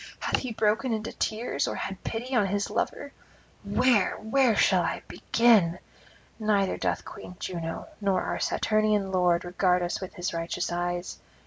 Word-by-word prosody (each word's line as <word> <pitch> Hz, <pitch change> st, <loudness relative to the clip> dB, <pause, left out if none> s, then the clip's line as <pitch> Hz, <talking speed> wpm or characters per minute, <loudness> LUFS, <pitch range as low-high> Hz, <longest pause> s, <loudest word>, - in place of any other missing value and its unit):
Hath -, -, +1 dB
he 255 Hz, -, -4 dB
broken 225 Hz, +3 st, +1 dB
into 220 Hz, 0 st, -3 dB
tears, 225 Hz, +3 st, -1 dB
or -, -, -2 dB
had 195 Hz, -1 st, -5 dB
pity 245 Hz, +3 st, -3 dB
on 210 Hz, -4 st, +3 dB
his 200 Hz, +1 st, -1 dB
lover? 285 Hz, -1 st, -2 dB, 0.5 s
Where, 210 Hz, +1 st, +2 dB
where 235 Hz, +1 st, +2 dB
shall -, -, +4 dB
I -, -, -2 dB
begin? 215 Hz, -8 st, +3 dB, 0.6 s
Now 215 Hz, -, -5 dB
neither 195 Hz, -1 st, +1 dB
doth -, -, -1 dB
Queen 180 Hz, -, -10 dB
Juno 165 Hz, -3 st, -5 dB
nor 195 Hz, -2 st, +1 dB
our -, -, -2 dB
Saturnian 215 Hz, -2 st, +1 dB
lord 180 Hz, -1 st, +2 dB
regard 180 Hz, 0 st, +2 dB
us 175 Hz, -, -2 dB
with 190 Hz, -, -7 dB, 0.2 s
righteous 165 Hz, +1 st, -2 dB
eyes. 175 Hz, 0 st, -3 dB
200 Hz, 155 wpm, -27 LUFS, 180-225 Hz, 0.6 s, shall